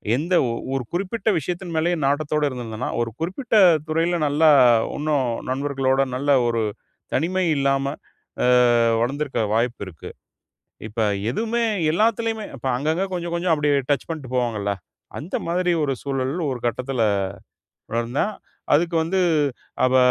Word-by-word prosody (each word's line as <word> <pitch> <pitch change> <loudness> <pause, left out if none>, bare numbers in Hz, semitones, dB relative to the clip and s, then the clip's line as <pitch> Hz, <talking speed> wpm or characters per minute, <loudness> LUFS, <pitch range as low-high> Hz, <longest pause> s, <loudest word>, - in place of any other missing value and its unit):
எந்த 165 +8 -2 0.2
ஒ - - -1 0.2
ஒரு 135 -1 -1
குறிப்பிட்ட 195 +4 -1
விஷயத்தின் 175 +3 -5
மேலயே 170 +2 +2
நாட்டத்தோடு 150 +2 +1
இருந்திருந்தேன்னா, 120 -3 -4
ஒரு 115 -1 -2
குறிப்பிட்ட 190 - -2 0.3
துறையில 165 +2 +1
நல்லா 150 +2 +4 0.5
இன்னும், 145 -4 0 0.2
நண்பர்களோடு, 135 0 +1
நல்ல 140 +3 0 0.2
ஒரு 115 -1 0 0.5
தனிமை 185 +3 +1
இல்லாம 135 0 +1 0.6
அ - - +3 0.5
வளர்ந்திருக்க 140 +2 -1
வாய்ப்பு 120 +2 0
இருக்கு. 80 -4 -10 0.8
இப்ப, 110 +2 -5 0.3
எதுவுமே 230 - -1 0.3
எல்லாத்துலயுமே, 225 +3 +1
இப்ப 135 - -8
அங்கங்கே 160 +8 0
கொஞ்சம், 175 -1 -3
கொஞ்சம் 170 0 +1
அப்டியே 145 -2 +2
டச் 145 - +1
பண்ணிட்டு 155 -6 -6
போவாங்கல்ல, 115 -5 0 0.5
அந்த 160 +7 -4
மாதிரி 180 +1 +1
ஒரு 140 - 0
சூழல் 135 -1 -2 0.2
ஒரு 125 -2 -4
கட்டத்துல 125 +1 -1 0.9
வளர்ந்தேன். 120 - -1 0.4
அதுக்கு 165 +3 +2
வந்து 185 +4 0 0.6
அப்ப 130 0 +3
145 Hz, 130 wpm, -22 LUFS, 130-175 Hz, 0.9 s, நல்லா